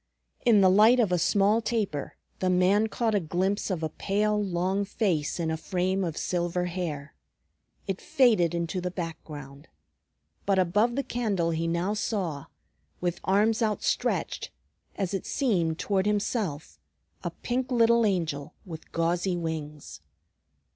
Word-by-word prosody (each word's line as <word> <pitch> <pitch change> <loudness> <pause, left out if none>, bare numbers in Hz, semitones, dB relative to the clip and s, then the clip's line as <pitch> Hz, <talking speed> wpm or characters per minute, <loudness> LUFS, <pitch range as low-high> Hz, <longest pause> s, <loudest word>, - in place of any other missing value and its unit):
In 225 -5 +5
the 190 - +6
light 220 +6 +6
of 215 -6 +2
a 180 - +2
small 205 +5 +3
taper 210 - -2 0.2
the 185 - +1
man 185 +4 +3
caught 225 +1 -1
a 205 - +3
glimpse 190 +5 -1
of 175 -4 -2
a 160 - 0
pale, 210 +4 0
long 190 +1 0
face 190 -7 -1
in 165 -1 0
a 160 - -1
frame 185 +3 -1
of 165 -3 -3
silver 175 0 -1
hair. 165 -5 -4 0.7
It 195 -2 -3
faded 215 -10 +3
into 170 +2 -2
the 180 - -2
background. 155 -5 -7 0.8
But 195 -1 +3
above 205 +6 +2
the 275 - 0
candle 210 -9 -1
he 165 +1 -1
now 170 +4 0
saw, 185 -9 -2 0.5
with 175 -1 -2
arms 215 +4 +3
outstretched 215 -2 -1 0.5
as 195 -1 -2
it 195 - -3
seemed 175 - +1
toward 195 0 0
himself, 205 - -2 0.4
a - - -1
pink 250 +1 -3
little 235 -1 +4
angel 160 -8 -1
with 160 -4 -10
gauzy 175 +2 0
wings. 150 - -5
185 Hz, 145 wpm, -27 LUFS, 165-210 Hz, 0.8 s, the